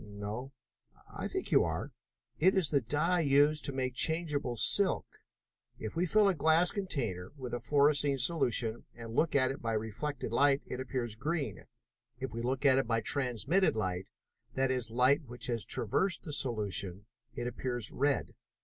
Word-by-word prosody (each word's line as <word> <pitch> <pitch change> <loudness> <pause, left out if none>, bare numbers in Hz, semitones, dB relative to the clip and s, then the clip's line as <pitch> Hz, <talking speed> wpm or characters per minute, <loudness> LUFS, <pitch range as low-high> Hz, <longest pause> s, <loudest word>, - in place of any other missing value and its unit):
"No." 105 +5 -6 0.6
"I - - -3
think - - -4
you - - +5
are. - - -3 0.5
It 185 +5 +4
is 185 -6 +3
the 140 -2 +3
dye 150 +9 +1
used 145 0 +3
in 140 - -5
making 130 -1 -1
changeable 150 -4 0
silk. 195 - +2 0.7
If 110 - -6
we 175 +2 +1
fill 210 +4 +5
a 195 - +3
glass 160 +3 +3
container 115 - -3
with 125 -3 -7
a 120 - -1
fluorescein 145 +1 +3
solution 120 -6 0
and 115 -1 -8
look 155 +6 +1
at 130 -1 +3
it 135 - -7
by 115 -1 -2
reflected 110 +5 -3
light 140 +3 +3
it 125 - -6
appears 125 -3 -3
green. 140 - -3 0.5
If 130 -3 -4
we 115 +1 -5
look 130 +3 -2
at 135 -1 +6
it 135 - -1
by 115 -1 +1
transmitted 135 - +1
light, 95 -3 -2 0.5
that 130 0 +1
is, 125 -3 -1
light 130 +6 +3
which 120 +1 -4
has 115 -3 -1
traversed 175 - 0
the 150 - -5
solution, 105 -7 -1 0.3
it 120 - -4
appears 120 -2 -2
red. 140 0 0
130 Hz, 170 wpm, -32 LUFS, 115-150 Hz, 0.7 s, at